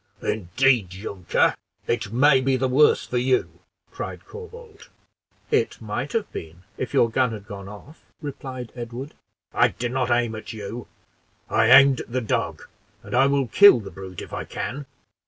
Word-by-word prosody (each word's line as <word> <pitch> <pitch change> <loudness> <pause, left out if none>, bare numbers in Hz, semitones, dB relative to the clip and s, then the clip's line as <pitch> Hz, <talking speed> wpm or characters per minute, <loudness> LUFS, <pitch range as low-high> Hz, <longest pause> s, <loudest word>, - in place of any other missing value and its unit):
"Indeed, 110 0 +1
younker! 95 -2 0 0.3
it 115 -4 -2
may 130 +3 +4
be 130 0 +1
the 130 +1 0
worse 140 +4 +4
for 125 - -1
you," 130 +1 0 0.3
cried - - -7
Corbould. 455 -1 -12 0.6
"It - - +1
might - - -4
have 225 -2 -1
been 85 +2 -9
if 125 -3 -4
your 115 - +4
gun 125 +1 +1
had 105 -2 -8
gone 100 -1 -9
off," 105 +10 -13 0.2
replied 130 -5 -7
Edward. 120 +3 -7 0.4
"I - - +5
did 120 0 -4
not 125 -1 -1
aim 120 -1 +1
at 110 +1 -7
you. 110 +2 -7 0.6
I - - +3
aimed 135 0 +7
at - - -12
the 130 - 0
dog, 115 - -2 0.4
and - - -9
I 130 +3 +5
will 140 -1 +1
kill 195 - +7
the 100 - -9
brute 95 -2 -8
if - - -12
I - - -3
can." 140 +2 -5
125 Hz, 170 wpm, -24 LUFS, 110-135 Hz, 0.6 s, aimed